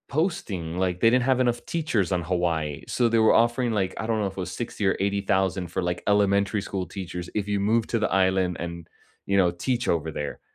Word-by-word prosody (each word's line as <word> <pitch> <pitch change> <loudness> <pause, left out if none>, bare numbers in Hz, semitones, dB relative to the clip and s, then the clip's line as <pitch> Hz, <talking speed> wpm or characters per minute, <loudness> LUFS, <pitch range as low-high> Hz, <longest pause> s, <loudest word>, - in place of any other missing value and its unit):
Posting 100 - -2
like 90 -1 0
they 115 - +5
didn't 125 +1 +3
have 130 0 +2
enough 120 -2 0
teachers 120 - -1
on 90 -1 +1
Hawaii, 85 -4 -1
so 120 - +1
they 115 0 +2
were 110 - +5
offering, 120 +1 +2
like 95 -4 0
I - - -3
don't 110 -1 0
know 105 - 0
if 95 - -6
it - - -22
was 90 -1 -4
$60,000 110 +1 -4
or 95 - +2
$80,000 95 -2 0
for, - - -1
like, 90 0 -2
elementary 100 0 +2
school 95 -2 -4
teachers 90 -2 -6
if 105 -1 -2
you 100 -1 0
move 110 +3 +2
to 115 - 0
the 110 - 0
island 95 -2 +2
and, 85 -1 -6 0.4
you 100 - +1
know, 90 -3 +4
teach 120 +8 -2
over 80 -1 0
there, 75 -1 -5
100 Hz, 230 wpm, -25 LUFS, 90-115 Hz, 0.4 s, they